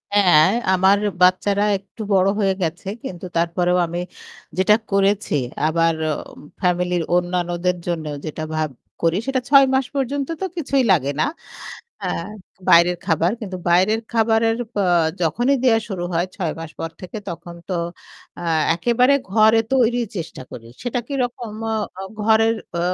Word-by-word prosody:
হ্যাঁ, 175 Hz, -5 st, +6 dB, 0.2 s
আমার 190 Hz, +2 st, +4 dB, 0.2 s
বাচ্চারা 195 Hz, +3 st, +3 dB
একটু 200 Hz, +3 st, -13 dB
বড় 190 Hz, 0 st, +4 dB
হয়ে 195 Hz, -2 st, +2 dB
গেছে 175 Hz, +3 st, -3 dB, 0.2 s
কিন্তু 180 Hz, 0 st, -7 dB
তারপরেও 175 Hz, +1 st, +1 dB
আমি 170 Hz, +1 st, -4 dB, 0.6 s
যেটা 200 Hz, +3 st, +5 dB, 0.2 s
করেছি 200 Hz, -3 st, +1 dB, 0.3 s
আবার 165 Hz, +1 st, +2 dB, 0.2 s
অ -, -, 0 dB, 0.5 s
ফ্যামিলির 180 Hz, -1 st, +1 dB
অন্যান্যদের 180 Hz, 0 st, 0 dB
জন্য 165 Hz, -3 st, -2 dB, 0.2 s
যেটা 155 Hz, 0 st, -5 dB
ভাব 155 Hz, -1 st, 0 dB, 0.3 s
করি 165 Hz, +2 st, +2 dB
সেটা 265 Hz, -1 st, +1 dB
৬ 275 Hz, -1 st, +8 dB
মাস 265 Hz, -1 st, +2 dB
পর্যন্ত 275 Hz, +1 st, -1 dB
তো -, -, 0 dB
কিছুই 275 Hz, -4 st, +1 dB
লাগে 140 Hz, -5 st, +2 dB
না -, -, +3 dB, 0.8 s
আ -, -, -1 dB, 0.6 s
বাইরের 175 Hz, +1 st, +6 dB
খাবার। 165 Hz, +4 st, +1 dB
কিন্তু 190 Hz, -4 st, -5 dB
বাইরের 190 Hz, +6 st, +3 dB
খাবারের 225 Hz, 0 st, +2 dB, 0.2 s
প -, -, -28 dB, 0.5 s
যখনই 240 Hz, -, +2 dB
দেয়া 225 Hz, -3 st, +5 dB
শুরু 180 Hz, -3 st, -4 dB
হয় 170 Hz, +2 st, +1 dB
৬ 170 Hz, -6 st, -2 dB
মাস 165 Hz, -1 st, -7 dB
পর 165 Hz, -, -4 dB
থেকে 185 Hz, +3 st, -7 dB
তখন 170 Hz, 0 st, -7 dB
তো 185 Hz, -, -2 dB, 0.7 s
আ -, -, -6 dB, 0.3 s
একেবারে 245 Hz, +9 st, +3 dB, 0.2 s
ঘরে 220 Hz, +2 st, +5 dB
তৈরির 240 Hz, -2 st, +2 dB
চেষ্টা 165 Hz, -5 st, -6 dB
করি। 115 Hz, -1 st, -10 dB, 0.2 s
সেটা 245 Hz, 0 st, -1 dB
কিরকম? 245 Hz, -5 st, -3 dB, 0.2 s
আ 210 Hz, -3 st, -4 dB, 0.2 s
ঘরের 225 Hz, +1 st, +4 dB, 0.2 s
অ -, -, 0 dB
190 Hz, 145 wpm, -21 LUFS, 175-225 Hz, 0.8 s, ৬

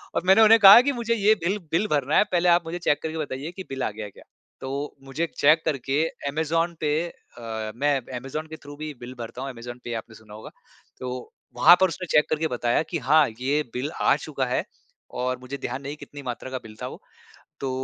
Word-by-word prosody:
और -, -, 0 dB
मैंने 190 Hz, +4 st, +6 dB
उन्हें 220 Hz, +1 st, +7 dB
कहा 200 Hz, +3 st, +10 dB
कि 285 Hz, +3 st, 0 dB
मुझे 235 Hz, -2 st, -1 dB
ये 215 Hz, 0 st, +4 dB
बिल 195 Hz, +4 st, 0 dB
बिल 195 Hz, +6 st, +1 dB
भरना 145 Hz, -1 st, +2 dB
है। -, -, +6 dB
पहले 175 Hz, 0 st, +3 dB
आप 175 Hz, 0 st, +4 dB
मुझे 170 Hz, +2 st, -5 dB
चेक 150 Hz, -3 st, +1 dB
करके 160 Hz, 0 st, -4 dB
बताइए 145 Hz, 0 st, -4 dB
कि 190 Hz, +1 st, -8 dB
बिल 135 Hz, -1 st, -4 dB
आ -, -, -1 dB
गया 105 Hz, 0 st, -7 dB
क्या? -, -, -17 dB, 0.4 s
तो 140 Hz, +2 st, -4 dB
मुझे 135 Hz, +5 st, -3 dB
चेक 155 Hz, +3 st, +5 dB
करके 140 Hz, +1 st, 0 dB, 0.3 s
अमेज़न 165 Hz, +3 st, 0 dB
पे 150 Hz, -1 st, +1 dB
अ, 110 Hz, -8 st, -7 dB
मैं 145 Hz, +3 st, +2 dB, 0.2 s
अमेज़न 145 Hz, +5 st, -5 dB
के 160 Hz, -, -7 dB
थ्रू 145 Hz, 0 st, -10 dB
भी 155 Hz, 0 st, -6 dB
बिल 120 Hz, +1 st, -8 dB
भरता 115 Hz, +2 st, -7 dB
हूँ 135 Hz, -, -4 dB
अमेज़न 120 Hz, 0 st, -9 dB
पे 120 Hz, -, -5 dB
आपने 110 Hz, 0 st, -7 dB
सुना 110 Hz, -1 st, -15 dB
होगा, 110 Hz, -, -10 dB, 0.5 s
तो 125 Hz, 0 st, -6 dB, 0.2 s
वहाँ 155 Hz, +8 st, +8 dB
पर 190 Hz, -, +6 dB
उसने 180 Hz, -, -5 dB
चेक 150 Hz, -, +4 dB
करके 155 Hz, +1 st, 0 dB
बताया 120 Hz, +1 st, 0 dB
कि 170 Hz, -, 0 dB
"हाँ, 150 Hz, +3 st, +4 dB
ये 145 Hz, +4 st, +1 dB
बिल 135 Hz, +5 st, -3 dB
आ -, -, +4 dB
चुका 145 Hz, -3 st, -3 dB
है" 125 Hz, 0 st, -1 dB, 0.5 s
और 125 Hz, 0 st, -1 dB
मुझे 130 Hz, +2 st, -7 dB
ध्यान 135 Hz, -, -5 dB
नहीं 140 Hz, +2 st, -5 dB
कितनी 145 Hz, -1 st, -10 dB
मात्रा 125 Hz, +1 st, -5 dB
का 130 Hz, -, -2 dB
बिल 110 Hz, -1 st, -12 dB
था -, -, -3 dB
वो। -, -, -10 dB, 0.6 s
तो 135 Hz, -, -2 dB
145 Hz, 225 wpm, -25 LUFS, 125-165 Hz, 0.6 s, कहा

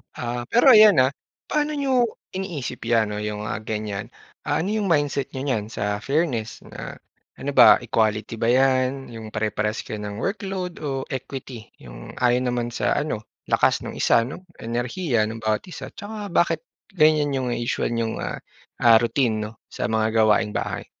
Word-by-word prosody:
Ah. 120 Hz, 0 st, -4 dB
Pero 240 Hz, -, +5 dB
ayan, 215 Hz, -, +8 dB
ah, 130 Hz, +1 st, +3 dB, 0.4 s
paano 300 Hz, 0 st, 0 dB
n'yo 265 Hz, -4 st, +2 dB, 0.3 s
iniisip 155 Hz, -10 st, -5 dB
'yan 115 Hz, -2 st, +2 dB
'no, 105 Hz, -, -4 dB
'yong, 105 Hz, 0 st, -4 dB
ah, -, -, -2 dB
ganyan. 105 Hz, -2 st, -5 dB, 0.3 s
Ah, 145 Hz, +2 st, +1 dB
ano 185 Hz, -, -2 dB
'yong 215 Hz, -1 st, 0 dB
mindset 145 Hz, -5 st, 0 dB
n'yo 130 Hz, -, -4 dB
niyan 115 Hz, -6 st, -2 dB
sa 105 Hz, 0 st, -1 dB
fairness? 135 Hz, -7 st, -1 dB
Na, -, -, -9 dB, 0.3 s
ano -, -, -5 dB
ba -, -, +7 dB
equality 110 Hz, 0 st, 0 dB
ba 115 Hz, -, -1 dB
'yan, 130 Hz, +2 st, +2 dB
'yong 110 Hz, -2 st, -9 dB
pare-parehas 105 Hz, 0 st, -1 dB
kayo 110 Hz, -, -6 dB
ng 105 Hz, 0 st, -6 dB
workload 190 Hz, -3 st, -3 dB
o 135 Hz, -2 st, -2 dB
equity, 130 Hz, -3 st, -6 dB, 0.2 s
'yong -, -, -10 dB
ayon 125 Hz, +1 st, +3 dB
naman 120 Hz, -1 st, -1 dB
sa 120 Hz, -, 0 dB
ano, 145 Hz, -8 st, -2 dB, 0.2 s
lakas -, -, +3 dB
ng -, -, -7 dB
isa -, -, +4 dB
'no, 135 Hz, +10 st, -7 dB, 0.2 s
enerhiya 120 Hz, +2 st, -1 dB
ng 110 Hz, +1 st, -6 dB
bawat 110 Hz, -1 st, 0 dB
isa, 145 Hz, -7 st, -8 dB
'tsaka 205 Hz, +3 st, -7 dB
bakit 170 Hz, 0 st, +2 dB, 0.3 s
ganyan 155 Hz, -4 st, +3 dB
'yong 130 Hz, -2 st, -1 dB
usual 120 Hz, 0 st, -1 dB
n'yong 115 Hz, -1 st, -2 dB
ah, -, -, -3 dB, 0.5 s
ah, 115 Hz, -1 st, +8 dB
routine 115 Hz, -2 st, +1 dB
'no 105 Hz, 0 st, -5 dB
sa -, -, -4 dB
mga 110 Hz, 0 st, +1 dB
gawaing 105 Hz, 0 st, +3 dB
bahay? -, -, -3 dB
120 Hz, 170 wpm, -23 LUFS, 110-150 Hz, 0.5 s, ayan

